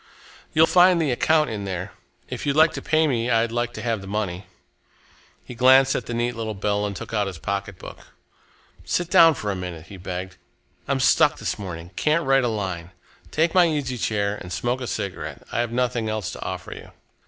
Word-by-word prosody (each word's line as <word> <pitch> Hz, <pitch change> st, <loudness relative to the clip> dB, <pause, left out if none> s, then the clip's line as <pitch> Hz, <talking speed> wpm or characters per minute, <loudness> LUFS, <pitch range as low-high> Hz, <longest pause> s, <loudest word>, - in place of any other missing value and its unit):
You'll 160 Hz, +1 st, +5 dB
find 180 Hz, 0 st, +5 dB
the 155 Hz, -5 st, +1 dB
account 155 Hz, +2 st, +2 dB
in 105 Hz, -2 st, -4 dB
there. 95 Hz, -2 st, -4 dB, 0.4 s
If -, -, -5 dB
you'd 140 Hz, -, +1 dB
like 160 Hz, +1 st, +5 dB
to -, -, -5 dB
pay 155 Hz, +2 st, +2 dB
me, 120 Hz, -5 st, 0 dB
I'd 115 Hz, -1 st, +2 dB
like 120 Hz, 0 st, -1 dB
to -, -, -7 dB
have 115 Hz, -4 st, -1 dB
the 95 Hz, -, -10 dB
money." 95 Hz, -2 st, -3 dB, 1.0 s
He -, -, -9 dB
glanced 130 Hz, +2 st, +5 dB
at 120 Hz, -, -3 dB
the 120 Hz, -, -4 dB
neat 120 Hz, +1 st, -1 dB
little 110 Hz, -2 st, -4 dB
bill 105 Hz, +1 st, 0 dB
and 100 Hz, -, -5 dB
took 90 Hz, -, -8 dB
out 105 Hz, -2 st, +1 dB
his 95 Hz, -3 st, -6 dB
pocketbook. 100 Hz, +1 st, -5 dB, 0.8 s
"Sit 175 Hz, -1 st, -2 dB
down 165 Hz, -2 st, +7 dB
for 105 Hz, -4 st, -3 dB
a -, -, -3 dB
minute," 90 Hz, -3 st, -6 dB
he 100 Hz, -, -9 dB
begged. 90 Hz, 0 st, -6 dB, 0.5 s
"I'm -, -, 0 dB
stuck -, -, +4 dB
this -, -, -3 dB
morning 85 Hz, -3 st, -7 dB
can't 155 Hz, +2 st, +1 dB
write 135 Hz, 0 st, +4 dB
a -, -, +1 dB
line. 95 Hz, -6 st, -3 dB, 0.4 s
Take 160 Hz, +2 st, +1 dB
my 180 Hz, -2 st, +6 dB
easy 140 Hz, -6 st, -2 dB
chair 105 Hz, -2 st, -1 dB
and 90 Hz, -3 st, -9 dB
smoke 120 Hz, +8 st, -2 dB
a 125 Hz, -, -4 dB
cigarette 100 Hz, -4 st, -5 dB
I -, -, -1 dB
have 120 Hz, -1 st, -1 dB
nothing 120 Hz, -2 st, -1 dB
else 110 Hz, -3 st, -3 dB
to -, -, -9 dB
offer -, -, -5 dB
you." -, -, -12 dB
115 Hz, 210 wpm, -23 LUFS, 100-135 Hz, 1.0 s, down